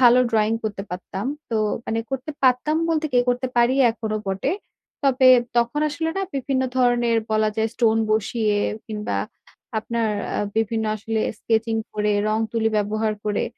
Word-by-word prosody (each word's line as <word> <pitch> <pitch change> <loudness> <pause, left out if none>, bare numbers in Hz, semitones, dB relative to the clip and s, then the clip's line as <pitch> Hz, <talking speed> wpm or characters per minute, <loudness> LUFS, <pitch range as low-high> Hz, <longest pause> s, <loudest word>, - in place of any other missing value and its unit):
ভালো 245 0 +7
drawing 220 0 +2
করতে 205 -2 -3
পারতাম। 190 +3 -5 0.2
তো 225 - 0 0.3
মানে 225 - -1
করতে 270 +2 -3
পারতাম 260 +4 +3
বলতে 315 -1 +1
কি 245 - +4
করতে 250 +1 +1
পারি 240 +2 +4 0.2
এখনো 220 -1 -3
বটে। 195 - -1 0.5
তবে 260 -1 +5 0.3
তখন 235 +5 +2
আসলে 300 +2 -2
না 390 - 0
বিভিন্ন 265 0 0
ধরনের 240 -2 +3 0.2
বলা 215 0 +3
যায় 220 0 +1
stone 225 -1 +3
বসিয়ে 215 0 +1 0.3
কিংবা 210 - -3 0.6
আপনার 230 0 -1 0.3
আ - - -1 0.2
বিভিন্ন 225 0 0
আসলে 220 +1 -2 0.2
sketching 225 0 0
করে, 210 0 0 0.2
রং-তুলি 225 +1 0
ব্যবহার 215 +1 0
করে 210 -1 0
225 Hz, 150 wpm, -23 LUFS, 215-250 Hz, 0.6 s, ভালো